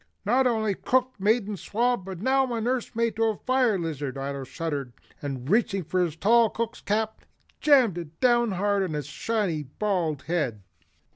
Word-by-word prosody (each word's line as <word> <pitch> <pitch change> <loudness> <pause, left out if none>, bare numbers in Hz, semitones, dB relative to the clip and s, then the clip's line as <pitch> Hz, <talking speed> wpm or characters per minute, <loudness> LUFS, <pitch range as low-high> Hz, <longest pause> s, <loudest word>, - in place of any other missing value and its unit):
"Not 255 +5 +3
only 220 -4 +1
cook, 255 +5 +1
mate 215 +4 +3
and 205 -1 -5
swab, 240 -2 0
but 190 -2 -7
now 265 0 +2
I'm 230 -2 -2
nursemaid 230 -2 -1
to 225 - +3
a 220 -1 +1
fire 255 -5 +2
lizard." 150 -6 -4
Ato 140 0 -4
shuddered, 140 -4 -4 0.3
and 135 -3 -5
reaching 200 0 +2
for 180 +3 0
his 165 -3 -2
tall 225 +6 +4
cook's 230 +1 -4
cap, 220 +1 -1 0.4
jammed 255 - +4
it 160 -1 -10
down 240 -3 +3
hard 200 +2 +1
on 185 -5 -2
his 150 -2 -3
shiny 180 +2 -1
bald 160 -1 -2
head. 140 - -2
200 Hz, 170 wpm, -26 LUFS, 160-235 Hz, 0.4 s, tall